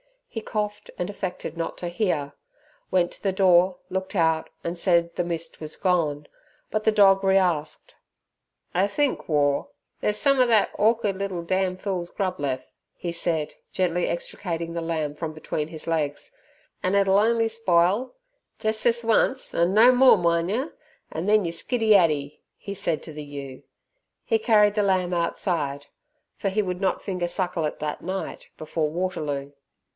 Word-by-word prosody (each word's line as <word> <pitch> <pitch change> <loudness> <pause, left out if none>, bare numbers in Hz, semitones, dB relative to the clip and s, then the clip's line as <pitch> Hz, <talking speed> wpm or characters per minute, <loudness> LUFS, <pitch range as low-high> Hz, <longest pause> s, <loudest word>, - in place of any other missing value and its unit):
He 225 - -6
coughed 210 -1 -4
and 180 +2 -3
affected 180 -4 -5
not 165 - -3
to 175 - -4
hear, 170 -7 -1 0.6
went 180 -2 +2
to - - -12
the 195 -2 0
door, 185 -1 +4
looked 190 +2 -4
out 160 -2 +2
and 170 +1 -3
said 170 -1 +2
the 175 - -1
mist 165 -1 -5
was 155 -1 -5
gone, 160 -6 0 0.5
but 215 0 -1
the 220 - +5
dog 195 -2 +5
re 195 0 +4
asked. 175 -5 -1 0.8
"I 185 +3 +2
think, 285 +6 -1
War, 145 -2 +2 0.3
there's 210 0 +1
some 275 +1 +3
er 255 - +6
that 225 -4 +3
orker'd 215 -2 +2
little 190 -3 -3
dam' 185 +1 0
fool's 185 -3 -3
grub 190 -2 -3
lef'," 135 -3 -2 0.3
he 175 - -4
said, 165 -2 -1 0.2
gently 180 -1 +1
extricating 170 -1 -4
the 170 - -3
lamb 160 -3 -2
from 155 0 -5
between 155 -1 -3
his 160 -1 -5
legs, 155 -3 -2 0.5
"an' 185 +2 +1
it'll 195 0 +4
on'y 225 +1 +2
spile. 210 - +2 0.5
Jes' 220 0 0
this 235 0 +2
once 230 +3 +1
'an 170 +2 +2
no 230 +4 +7
more, 255 -2 +6
min' 170 -1 +1
yer, 255 +10 -2 0.4
an' 160 +3 -4
then 210 0 +4
you 165 - -1
skiddy 225 +5 +2
addy," 150 -6 +2 0.2
he 200 - -7
said 170 -5 -1
to 160 - -9
the 150 0 -7
ewe. 140 -2 -8 0.6
He 225 - +1
carried 210 -2 +4
the 210 - +2
lamb 185 -3 +1
outside, 160 -5 -1 0.5
for 200 - -2
he 205 +3 +1
would 180 -1 -4
not 190 - 0
finger 180 -3 -2
suckle 175 -2 -1
it 150 - -4
that 150 0 -4
night 190 +2 -5
before 155 0 -2
Waterloo. 150 -5 -3
180 Hz, 170 wpm, -25 LUFS, 165-205 Hz, 0.8 s, no